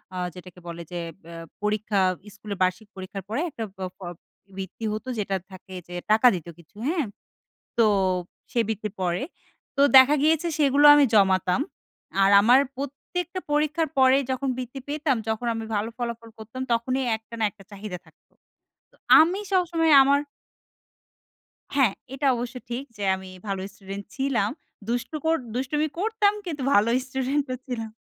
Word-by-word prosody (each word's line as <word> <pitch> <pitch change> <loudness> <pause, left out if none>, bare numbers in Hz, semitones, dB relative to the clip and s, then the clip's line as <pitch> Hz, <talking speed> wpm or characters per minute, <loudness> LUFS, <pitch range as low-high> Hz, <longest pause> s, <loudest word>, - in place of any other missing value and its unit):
আ - - -4 0.2
যেটাকে 180 0 -12
বলে 170 0 -6
যে 175 - -4 0.3
এ্যা 170 0 -10 0.3
পরীক্ষা 210 -1 0 0.4
স্কুলের 205 -1 -7
বার্ষিক 185 +4 -1
পরীক্ষার 190 0 -7
পরে 225 +7 -1
একটা 235 -7 -6
বা 190 - -4
প - - -25 0.6
বৃত্তি 195 +4 -6
হত। 215 +3 -5
যেটা 195 -1 -1 0.2
থাকে 185 0 -11
যে 175 - -8 0.2
টাকা 220 +3 +6
দিত 170 -1 -7
কিছু, 170 +4 -20
হ্যাঁ? 320 -4 0 0.7
তো 230 - +5 0.7
সেই 235 - +2
বৃত্তির 215 -2 -3
পরে। 175 +3 0 0.5
তো - - +4 0.2
দেখা 260 +3 +7
গিয়েছে 320 +2 +3
সেগুলো 285 0 +4
আমি 290 -1 +6
জমাতাম। 190 +1 +3 0.6
আর 195 - +5
আমার 245 +5 +6 0.2
প্রত্যেকটা 315 +7 -5
পরীক্ষার 305 +2 +1
পরে 260 +1 +6
যখন 265 +1 -1
বৃত্তি 255 +1 -6
পেতাম 295 -1 0
যখন 220 +2 -2
আমি 225 0 -4
ভালো 210 +2 -1
ফলাফল 235 -2 -5
করতাম 220 +4 -8
তখনই 255 +3 0
একটা 225 +1 -12
না - - 0
একটা 200 -1 -17
চাহিদা 200 -2 -6
থাকত। - - -25 0.6
তো - - -26 0.3
আমি 350 +5 +2
সবসময় 335 -4 +3
আমার 280 +1 +3 1.5
হ্যাঁ, 260 -8 +4 0.2
এটা 275 +1 0
অবশ্য 240 +1 -5
ঠিক। 240 +3 -3
যে 205 - -5
আমি 190 0 -10 0.2
ভালো 195 -1 -2
স্টুডেন্ট 195 0 -8
ছিলাম। 265 -7 0 0.4
দুষ্টু 245 +6 -2
কর 325 0 +4 0.2
দুষ্টুমি 295 +4 0
করতাম 420 0 +2
কিন্তু 305 -5 -4
ভালো 210 +3 +4 0.2
স্টুডেন্ট 265 +2 -1
ও - - -2
ছিলাম। 225 -4 -5
235 Hz, 155 wpm, -25 LUFS, 200-285 Hz, 1.5 s, দেখা